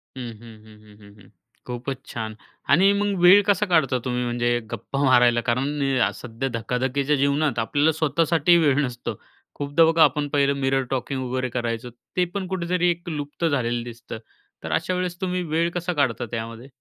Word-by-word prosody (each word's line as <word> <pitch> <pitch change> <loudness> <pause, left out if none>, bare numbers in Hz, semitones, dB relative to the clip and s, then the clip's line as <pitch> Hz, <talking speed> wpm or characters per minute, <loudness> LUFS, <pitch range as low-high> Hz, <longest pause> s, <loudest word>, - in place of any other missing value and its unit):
हं, 125 -2 -6
हं, 115 -2 -13
हं, 105 -1 -17
हं, 100 -1 -16
हं. - - -19 0.4
खूपच 125 +2 -6
छान. 110 -2 -5 0.3
आणि 185 +8 +5
मग 205 -2 -1
वेळ 185 +3 +8
कसा 205 0 +3
काढता 160 -9 +2
तुम्ही 125 -1 -1
म्हणजे 120 0 0
गप्पा 135 +5 -3
मारायला? 120 -2 +4
कारण 140 +5 -1 0.3
सध्या 115 +5 -5
धकाधकीच्या 130 +5 0
जीवनात 140 -1 +1
आपल्याला 145 +7 +2
स्वतःसाठी 160 +2 +2
वेळ 145 -5 +3
नसतो, 125 -2 -4 0.4
खूपदा 145 +3 +3
बघा, 165 0 +5
आपण 150 -2 +2
पहिलं 140 -1 +3
मिरर 135 0 +1
टॉकिंग 135 +1 -2
वगैरे 130 0 -2
करायचं, 120 0 -3 0.3
ते 180 - +3
पण 200 -2 -3
कुठेतरी 180 -1 0
1 175 0 -3
लुप्त 150 +1 -4
झालेलं 120 -6 0
दिसतं. 120 -1 -8 0.5
तर 80 - -5
अशा 80 - 0
वेळेस 180 -1 -3
तुम्ही 180 -1 -1
वेळ 165 +1 0
कसा 175 +1 -2
काढता 130 -6 0
त्यामध्ये? 115 +1 -6
135 Hz, 170 wpm, -23 LUFS, 120-165 Hz, 0.5 s, वेळ